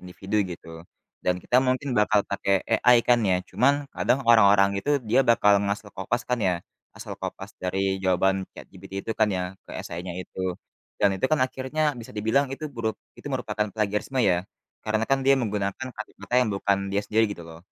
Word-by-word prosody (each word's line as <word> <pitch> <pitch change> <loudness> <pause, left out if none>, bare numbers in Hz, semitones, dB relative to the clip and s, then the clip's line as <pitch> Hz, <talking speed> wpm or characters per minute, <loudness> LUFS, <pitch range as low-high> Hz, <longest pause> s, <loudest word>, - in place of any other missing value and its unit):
individu 95 +3 -5
gitu 90 -2 -9 0.6
dan 90 0 +1
kita 120 - +1
mungkin 130 +1 +1
bakal 105 0 +4
pakai 100 -1 +1
AI 120 +2 +5
kan 120 -1 +5
ya. 95 -2 +3
Cuman 140 +3 +3 0.2
kadang 130 - +1
orang-orang 100 -3 +6
itu 145 - -2 0.2
dia 115 - +4
bakal 105 -3 +5
ngasal 100 +1 -3
copas 120 +6 -1
kan 125 - +1
ya, 95 -3 +2 0.4
asal - - -7
copas - - -6
dari 95 +1 0
jawaban 95 +1 +2
ChatGPT 95 0 -13
itu - - -4
kan 110 -1 +4
ya 90 - -1 0.2
ke - - -11
essay-nya 90 +1 -6
itu. 95 - -9 0.6
Dan 100 -1 +5
itu 95 - +1
kan 155 +1 +1
akhirnya 130 +4 -2 0.2
bisa 115 - -11
dibilang 110 +7 +2
itu 155 - -8
buruk 115 -4 -2 0.2
itu - - -13
merupakan 105 - -1
plagiarisme 105 +5 -1
ya. 90 -3 +2 0.4
Karena 110 +1 0
kan 135 - +3
dia 135 - +6
menggunakan 105 -1 -2
kalimatnya 110 +2 -4
yang 110 - -2
bukan 100 0 +1
dia 100 - +2
sendiri 110 +2 +2
gitu 95 - -10
loh, 80 - -11
105 Hz, 185 wpm, -25 LUFS, 95-120 Hz, 0.6 s, orang-orang